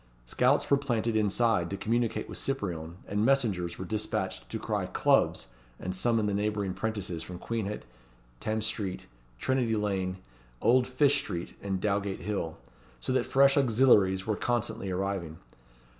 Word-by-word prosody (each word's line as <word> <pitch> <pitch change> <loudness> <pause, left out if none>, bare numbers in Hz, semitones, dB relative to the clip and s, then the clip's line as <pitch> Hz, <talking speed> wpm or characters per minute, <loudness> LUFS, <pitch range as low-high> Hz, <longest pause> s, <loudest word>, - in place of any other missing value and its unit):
Scouts 125 - +2
were 140 - +7
planted 120 -5 -1
inside, 110 -3 +2
to 100 - -3
communicate 115 +1 0
with - - -5
Cyprien, 85 -11 -3
and 105 +1 0
messengers 110 -10 +1
were 95 - -5
despatched 105 - -3
to - - -3
cry - - -2
"Clubs!" - - +2 0.3
and 90 0 -3
summon 115 +2 +2
the 105 - 0
neighbouring 105 -1 -1
'prentices 100 -7 -3
from 90 - -7
Queenhithe, 105 0 -3 0.6
Thames 110 0 -1
Street, 105 -4 -3 0.3
Trinity 125 - +1
Lane, 95 -3 -1 0.4
Old 125 +1 +4
Fish 140 +2 +3
Street, 85 -10 -5
and 95 -2 -2
Dowgate 100 -1 -1
Hill; 85 -4 -3 0.4
so 130 - -2
that 130 - +1
fresh 135 0 +5
auxiliaries 110 -8 +4
were 110 - 0
constantly 120 -4 -1
arriving. 95 -4 -2
105 Hz, 145 wpm, -29 LUFS, 95-120 Hz, 0.6 s, were